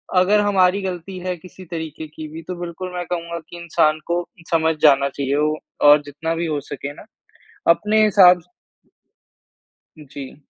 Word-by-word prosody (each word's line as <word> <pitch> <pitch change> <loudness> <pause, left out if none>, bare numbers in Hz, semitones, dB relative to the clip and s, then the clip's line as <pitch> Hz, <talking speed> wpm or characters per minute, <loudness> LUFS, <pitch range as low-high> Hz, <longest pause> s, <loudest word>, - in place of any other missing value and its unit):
अगर 195 +3 +4
हमारी 195 -1 +3
गलती 185 0 -5
है 180 -1 -1
किसी 185 +2 -13
तरीके 160 -1 -6
की 155 +1 -9
भी 160 +2 -9
तो 180 +2 -6
बिल्कुल 175 +1 -6
मैं 175 -1 -4
कहूँगा 170 -1 -3
कि 175 - -9
इंसान 155 -2 +1
को 175 +1 0 0.3
समझ 160 -1 +2
जाना 140 -2 +5
चाहिए 140 0 -2
वो। 155 +1 +1 0.3
और 150 0 +7
जितना 160 +3 -4
भी 170 +1 -2
हो 150 -2 -1
सके 145 +1 -6
ना - - -14 0.7
अपने 215 +5 +3
हिसाब 180 -4 +6 1.6
जी। 145 -2 -10
170 Hz, 160 wpm, -21 LUFS, 155-180 Hz, 1.6 s, और